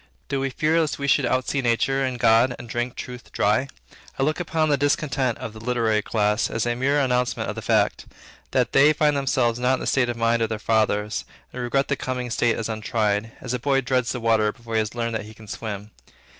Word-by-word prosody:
Do 140 0 -1
we 135 0 -1
fear 155 +4 +1
lest 155 -2 -1
we 140 - -3
should 135 - +3
outsee 130 +2 0
nature 135 +3 +1
and 130 -2 -2
God, 115 +3 +4
and 120 - -10
drink 120 +2 -3
truth 125 -2 -8
dry? 105 +6 +1 0.5
I 135 - +1
look 155 +4 0
upon 160 -2 0
the 145 - +4
discontent 140 -3 0
of 110 - -7
the 110 - -10
literary 115 -3 +1
class, 105 0 +1
as 115 0 -1
a 120 - +1
mere 140 +4 +1
announcement 125 -2 0
of - - -4
the - - -5
fact, - - +1 0.4
that - - +1
they 145 +3 +6
find 150 -1 +2
themselves 130 -4 +1
not 125 +1 +2
in - - -6
the - - -4
state 125 -3 +2
of 120 - -3
mind 115 0 +2
of 115 - +1
their 110 - -2
fathers, 105 -1 0 0.3
and 125 - -5
regret 135 +3 0
the 140 - 0
coming 125 -2 -4
state 115 0 +2
as 115 - -2
untried; 110 -1 -1
as - - -4
a 125 - -1
boy 135 +2 +2
dreads 125 -2 0
the 125 - -3
water 110 -2 +2
before 115 +1 -10
he 110 - +3
has 110 +2 -2
learned 115 -1 -2
that 110 -2 -3
he 110 +1 -12
can 110 0 -14
swim. 105 -1 -6
120 Hz, 235 wpm, -24 LUFS, 110-135 Hz, 0.5 s, they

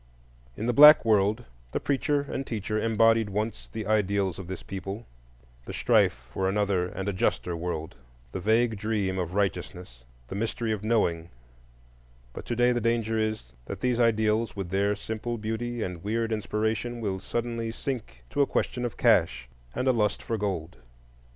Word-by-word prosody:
In 110 - -3
the 120 - +1
Black 150 +1 +9
World, 105 +2 +2 0.3
the - - 0
Preacher 145 +1 +1
and 140 -1 -4
Teacher 110 -1 -2
embodied 115 -1 +3
once 105 +3 -3
the 110 -1 -6
ideals 100 -3 +1
of 95 - -7
this 95 -1 -6
people—the - - -9
strife 60 0 +2
for 95 0 0
another 100 -3 +1
and 95 +2 -5
a 100 - 0
juster 90 -1 0
world, 85 -2 -4 0.4
the - - -4
vague 110 +3 +2
dream 100 -3 -1
of 90 +1 -3
righteousness, 90 -9 -3 0.2
the - - -7
mystery 115 +2 -2
of 105 -2 -2
knowing; 85 -7 +1 1.0
but - - -8
to 120 - -1
day 120 +1 +4
the 120 -1 0
danger 115 -1 +1
is 110 - -2
that - - -6
these 125 -1 +1
ideals, 110 -1 +2
with 95 -3 -5
their 100 +2 +2
simple 110 +3 -4
beauty 115 +2 -3
and 90 -2 -5
weird 115 +2 -1
inspiration, 110 +2 -1
will 100 -4 -2
suddenly 115 +3 -3
sink 115 - -5
to - - +1
a 140 - +4
question 125 - -1
of 120 - -5
cash 60 0 +3 0.3
and 130 - -1
a 130 - +5
lust 105 -3 0
for 115 - -2
gold. 95 -6 -3
105 Hz, 170 wpm, -27 LUFS, 95-115 Hz, 1.0 s, Black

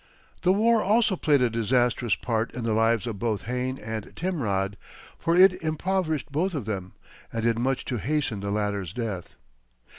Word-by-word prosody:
The 180 - +4
war 220 +3 +4
also 215 0 +3
played 145 -6 +3
a 125 - +3
disastrous 120 +1 +1
part 115 -1 -1
in 125 - -4
the 115 -1 0
lives 115 +1 +2
of 110 -5 -4
both 110 -2 -1
Hayne 125 +2 -2
and 110 -2 -6
Timrod, 105 - -1 0.4
for 165 - +1
it 180 0 +6
impoverished 160 -2 -1
both 170 +5 0
of 135 -8 -3
them, 95 -4 -4 0.4
and 115 -1 -3
did 115 0 +2
much 130 +2 0
to 125 - -2
hasten 130 - -1
the 100 0 -4
latter's 100 -3 -2
death. 105 -7 -4
120 Hz, 175 wpm, -26 LUFS, 110-160 Hz, 0.4 s, it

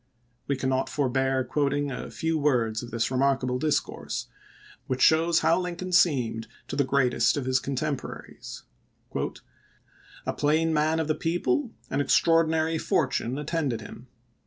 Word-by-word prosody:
We 140 - +1
cannot 130 0 0
forbear 135 -1 +1
quoting 145 0 0
a 125 - -5
few 160 0 -2
words 120 -7 +1
of 120 - -8
this 115 +1 -1
remarkable 130 -1 +1
discourse, 155 +1 -2 0.6
which 130 -1 -2
shows 165 +1 +4
how 165 +2 +3
Lincoln 180 0 -4
seemed 125 -10 +2 0.2
to - - -3
the 140 - +3
greatest 135 0 +2
of 140 - -2
his 130 0 +2
contemporaries: 140 +1 -5 1.6
"A - - -1
plain 160 +2 +2
man 155 +1 +2
of 160 - -1
the 155 - +2
people, 175 - 0 0.2
an 135 - +1
extraordinary 160 +2 +3
fortune 130 -4 0
attended 150 -6 -2
him. 115 +3 -11
145 Hz, 135 wpm, -27 LUFS, 130-160 Hz, 1.6 s, shows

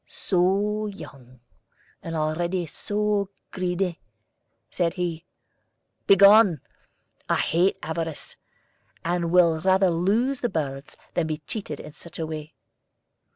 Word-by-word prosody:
"So 200 +3 0
young, 130 - -11 0.6
and 165 0 -5
already 170 +3 -1
so 205 +3 -1 0.2
greedy!" 180 -1 -2 0.7
said 175 -1 -1
he. 175 -2 -3 0.8
"Begone! 200 -3 +7 0.7
I - - +3
hate 175 +4 +2
avarice, 160 0 -3 0.7
and 170 0 0
will 170 -2 +4
rather 190 0 +4
lose 220 +11 +1
the 240 - 0
birds 140 -5 -4 0.2
than 170 -2 0
be 155 -1 -2
cheated 155 -5 -5
in 150 - -10
such 170 - -10
a 160 - -2
way." 155 -1 -7
175 Hz, 110 wpm, -25 LUFS, 160-195 Hz, 0.8 s, Begone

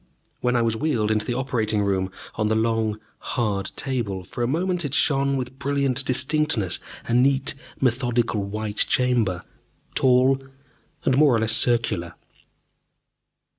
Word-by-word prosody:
When 125 0 0
I 120 - +3
was 115 -1 +1
wheeled 110 -5 0
into 110 -1 0
the 120 - -1
operating 115 -5 0
room 95 -2 0 0.2
on 105 - -1
the 110 - +1
long, 110 -1 0 0.2
hard 105 -5 -2
table, 115 -9 -3
for 100 - -7
a 120 - +1
moment 175 +5 -1
it 145 -1 -2
shone 140 -2 +2
with 130 +1 -6
brilliant 140 -1 0
distinctness, 135 - +1 0.3
a 115 - -2
neat, 135 +3 +3 0.3
methodical 120 -3 +1
white 105 +1 -5
chamber, 115 -8 +1 0.5
tall 130 +1 +3 0.6
and 130 - +3
more 145 -5 +5
or - - +2
less 110 0 +1
circular. 110 -9 +1
120 Hz, 140 wpm, -23 LUFS, 110-135 Hz, 0.6 s, more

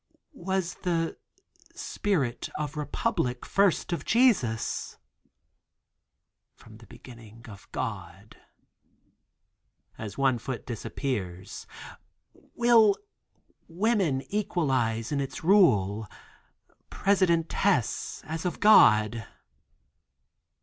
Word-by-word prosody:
"Was 190 -6 -2
the 165 -2 -1 0.6
spirit 145 - -2
of 150 0 -4
republic 150 - -2
first 195 -3 +1
of 170 - -3
Jesus?" 210 - +1 1.6
"From 110 -1 -16
the 115 -1 -17
beginning 115 0 -14
of 100 -4 -13
God." - - -6 1.6
As 105 -3 -7
a 135 -3 +2
foot 130 0 -6
disappears. 100 -6 -5 0.9
"Will 230 -4 +5 0.7
woman 180 - 0
equalize 130 - 0
in 140 -1 0
its 135 - -6
rule, 110 - +3 0.8
Presidentess 185 - +1
as 160 +1 -5
of 180 - -3
God?" 110 - +5
145 Hz, 80 wpm, -27 LUFS, 115-190 Hz, 1.6 s, Will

